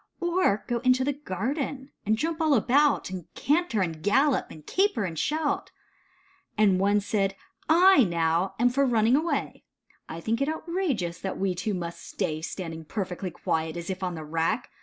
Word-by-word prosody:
Or 345 - +1
go 240 -1 0
into 255 +1 +3
the 285 +2 0
garden, 270 - -4 0.2
and 220 +1 +3
jump 325 +6 -2
all 310 -3 +4
about. 270 +1 +3
And 185 -3 -7
canter 295 - +1
and 165 -4 -2
gallop, 265 - +2
and 155 -1 -12
caper 380 - +1
and 180 -4 -3
shout? 305 0 -1 0.9
And 200 -3 +4
one 200 +2 +3
said, 195 -1 0 0.2
"/, 225 - -36
now, 190 - +4
am 245 +2 +4
for 275 +3 +1
running 235 -2 +3
away, 320 +4 -1 0.5
I 165 - -6
think 225 +8 -1
it 280 - +1
outrageous, 315 - -2
that 190 - -4
we 195 -1 0
two 195 +3 -2
must 170 -1 -5
stay 155 0 -3
Standing 165 -2 -6
perfectly 185 +1 -4
quiet, 160 -1 -2
as 170 +2 -4
if 190 - -5
on 180 -2 -2
the 160 -1 -7
rack. 165 +10 -1
215 Hz, 175 wpm, -27 LUFS, 180-280 Hz, 0.9 s, all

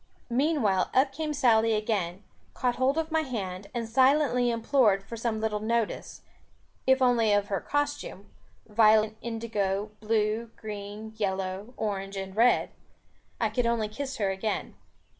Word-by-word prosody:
Meanwhile 240 - +2
up 270 +1 +4
came 305 +2 -3
Sally 230 -6 +3
again, 205 -4 -2 0.3
caught 245 -1 0
hold 265 +3 +2
of 320 0 -1
my 320 0 +2
hand, 200 -8 -5
and 235 -2 -3
silently 260 0 +3
implored 230 -4 +2
for 225 +4 -8
some 230 -1 -2
little 215 -1 -1
notice, 225 +1 -2 0.6
if 265 0 +4
only 235 -3 +3
of 205 0 +1
her 195 - -1
costume, 290 -8 -3 0.3
violet, 215 0 +4
indigo, 215 -3 -2
blue, 220 +1 0
green, 210 +1 -7
yellow, 195 +2 -3
orange 195 -2 -3
and 190 0 -6
red. 235 +3 +3 0.7
I 225 - +1
could 240 +1 0
only 230 -2 +1
kiss 270 +5 -5
her 200 -4 0
again. 190 +3 -3
220 Hz, 140 wpm, -28 LUFS, 205-250 Hz, 0.7 s, up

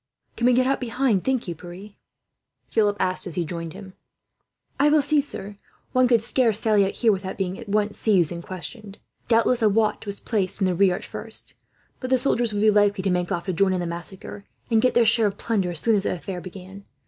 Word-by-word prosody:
"Can 240 - +1
we 250 - +5
get 255 +1 +3
out 270 +1 0
behind, 235 -4 0
think 260 -5 -1
you, 175 - -2
Pierre?" 175 +5 -11 0.8
Philip 205 -2 +2
asked, 185 +1 0
as 170 - -5
he 175 - -1
joined 165 0 -6
him. 190 -2 -11 0.9
"I 290 +2 +5
will 300 -1 +4
see, 300 0 +2
sir. 205 -7 -8 0.3
One 255 0 +4
could 235 -3 +3
scarce 230 -3 +1
sally 215 -3 +3
out, 195 - -3
here, 230 -2 +2
without 190 -1 -3
being 190 -1 -3
at 230 - -10
once 210 0 0
seized 185 -7 +3
and 170 -1 -5
questioned. 195 +4 -9 0.3
Doubtless 235 +1 +3
a 215 - +5
watch 215 +1 0
was 200 0 -3
placed 200 -5 -2
in 195 - +2
the 185 - +1
rear, 185 0 +3
at - - -7
first; - - -7 0.5
but 255 - -5
the 260 - +4
soldiers 240 -3 0
would 205 -1 -2
be 215 - +6
likely 205 -1 +2
to 195 - +1
make 180 -1 -1
off, 170 - -2
to 190 - -2
join 190 +2 +2
in 185 - -1
the 175 - -2
massacre 175 +4 -7 0.3
and 225 -1 +4
get 255 - +2
their 240 -1 +5
share 225 -1 +4
of 200 0 -4
plunder, 205 -6 -1
as 170 -3 -1
soon 230 - +2
as 205 - +3
the - - -1
affair 180 +1 -6
began. 190 +2 -11
205 Hz, 235 wpm, -24 LUFS, 185-230 Hz, 0.9 s, be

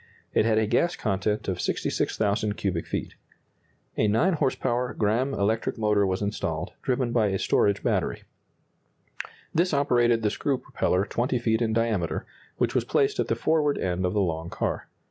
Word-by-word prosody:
It - - +3
had 110 -1 +3
a 110 - +3
gas 170 +11 +1
content 105 0 -1
of 90 -2 -2
66,000 105 0 -1
cubic 90 -4 -2
feet. - - -4 0.8
A 110 - +3
9 135 - +3
horse 145 -5 +1
power 125 +1 -1
Gramme 120 +6 +1
electric 110 +3 0
motor 105 -2 +2
was 95 +2 -1
installed, 100 +1 -3
driven 125 -2 0
by 115 -3 +3
a 95 -1 0
storage 100 +1 +2
battery. - - 0 1.3
This 170 -1 +2
operated 120 -5 +3
the 105 - +2
screw 140 -2 0
propeller 95 -5 0
20 125 +4 -1
feet 115 -1 +1
in 110 -2 +1
diameter, 110 -7 0 0.3
which - - +1
was - - +2
placed 420 -2 +1
at - - +1
the - - +1
forward 155 -2 +1
end 90 0 -1
of 90 0 0
the 105 - +3
long 85 -2 -2
car. - - -3
110 Hz, 170 wpm, -26 LUFS, 100-125 Hz, 1.3 s, It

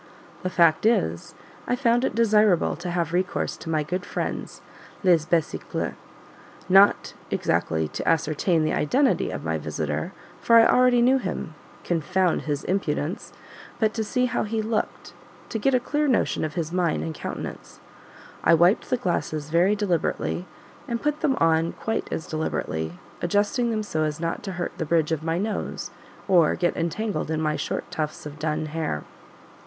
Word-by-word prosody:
The 185 - -2
fact 170 +2 +4
is, 85 - 0 0.3
I - - +2
found 240 -1 +2
it 210 - -1
desirable 210 -5 +3
to 175 +3 -6
have 170 -2 -1
recourse 180 +1 -1
to 160 - -8
my 155 -2 +1
good 180 +4 -3
friends - - -4 0.4
"les 170 -4 +4
besicles;" 165 -3 -1 0.7
not 195 +2 +5 0.2
exactly 80 -1 0
to - - -5
ascertain 160 +1 +2
the 155 - 0
identity 265 - +2
of - - -5
my - - -1
visitor - - -3 0.3
for 230 - +3
I 230 0 +8
already 250 -1 +5
knew 260 +2 +4
him, 155 - -4 0.3
confound 180 +2 +1
his 145 -1 -1
impudence! 170 -3 -2 0.5
but 220 -2 +1
to 225 - -1
see 250 +4 0
how 250 - -1
he 220 +1 -2
looked 220 0 -2 0.4
to 225 - -3
get 265 +5 +2
a - - +4
clear 295 +4 0
notion 255 - +1
of 155 0 -3
his 165 -2 -2
mien 175 -3 +1
and 160 - -4
countenance. - - -7 0.6
I 170 - +6
wiped 175 +5 +3
the 255 - +2
glasses 155 -7 -2
very 180 +5 +4
deliberately, 180 -2 -1 0.4
and 235 -1 -2
put 300 +2 -1
them 270 -3 +2
on 165 0 +2
quite 225 - -3
as 160 - -3
deliberately; 80 - -3 0.3
adjusting 205 +7 +1
them 215 -2 -1
so 155 -6 -2
as 150 0 -2
not 165 0 -2
to 195 - -4
hurt 175 0 -3
the 160 - -1
bridge 165 -1 +2
of 160 -2 0
my 165 +1 -1
nose 210 +3 -3 0.4
or 175 -5 +4
get 175 -1 0
entangled 170 +1 -2
in 160 -1 -1
my 155 -1 0
short - - -4
tufts 155 -1 -4
of 150 0 -8
dun 155 +1 -1
hair. 155 - -3
175 Hz, 170 wpm, -25 LUFS, 160-220 Hz, 0.7 s, I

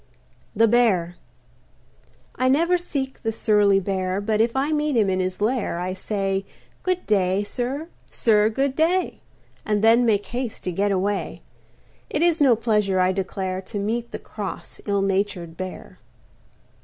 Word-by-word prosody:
THE 225 +2 +5
BEAR 205 -7 +2 1.2
I 255 0 +1
never 335 +6 +3
seek 270 -6 -4
the 225 - -1
surly 210 -3 +3
Bear, 190 0 -2
But 215 +1 +1
if 230 +2 +1
I 275 +3 +1
meet 300 -3 +1
him 205 -4 +3
in 185 - 0
his 185 +1 -2
lair 220 -4 0
I 180 +1 -2
say, 195 0 -2 0.4
"Good 365 -1 -1
day, 195 -1 +2
sir; 260 +8 -3 0.2
sir, 215 -2 +3
good 270 +4 -1
day," 345 +4 +1 0.4
And 210 -1 0
then 230 +2 +6
make 210 -3 +2
haste 245 -2 -5
to 180 - -2
get 200 +4 0
away. 195 +1 -2 0.7
It 300 - 0
is 340 -2 +3
no 265 -5 +6
pleasure, 210 -4 +1
I 185 0 +3
declare, 190 0 -3
To 205 +2 -7
meet 230 +4 -2
the - - -5
cross, 205 -3 -7
ill 200 -1 +1
natured 195 -4 -1
Bear. 185 +1 -8
210 Hz, 155 wpm, -23 LUFS, 195-245 Hz, 1.2 s, then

